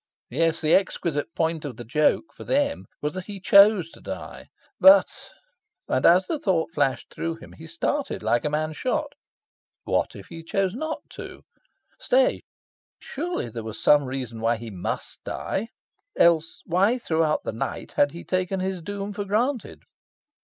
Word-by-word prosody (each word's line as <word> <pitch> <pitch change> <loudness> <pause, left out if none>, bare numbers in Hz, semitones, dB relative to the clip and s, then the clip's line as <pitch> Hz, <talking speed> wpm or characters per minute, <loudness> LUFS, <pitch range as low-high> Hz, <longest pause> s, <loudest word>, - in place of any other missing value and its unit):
Yes, 165 +4 +1
the 155 0 +2
exquisite 165 -5 0
point 160 -1 0
of 135 -6 -6
the 120 - -7
joke, 150 - +1
for - - -10
them, 285 +1 0 0.2
was 150 - -1
that 185 -1 -6
he 205 -2 -6
CHOSE 200 -3 +6
to - - -16
die. - - -7 0.3
But 290 +1 +8 0.8
and, - - 0
as 180 +2 +6
the 320 - -2
thought 175 -8 0
flashed 135 -5 -1
through 165 0 -3
him, 165 - -13
he 160 - -12
started 285 - -2
like 120 - +2
a 150 - 0
man 155 +1 -1
shot 270 - -2 0.7
what - - 0
if - - -10
he 165 -1 -8
chose 190 +3 -1
not 315 +6 -4
to? - - -9 0.6
Stay, - - +2 0.6
surely 335 - -4
there 115 +1 -6
was 110 -1 -7
some 145 -1 +5
reason 130 -3 -5
why 115 +1 +2
he 115 -1 -8
MUST 90 -3 -5
die. 210 +4 -3 0.5
Else, 165 -1 +3
why 195 +8 +2
throughout 160 -8 0
the - - -3
night 110 - -4
had 145 - +2
he 170 - -9
taken 185 +1 -1
his 185 -1 -2
doom 200 +3 -5
for 205 0 -3
granted?... 235 +5 -1
170 Hz, 165 wpm, -25 LUFS, 150-205 Hz, 0.8 s, But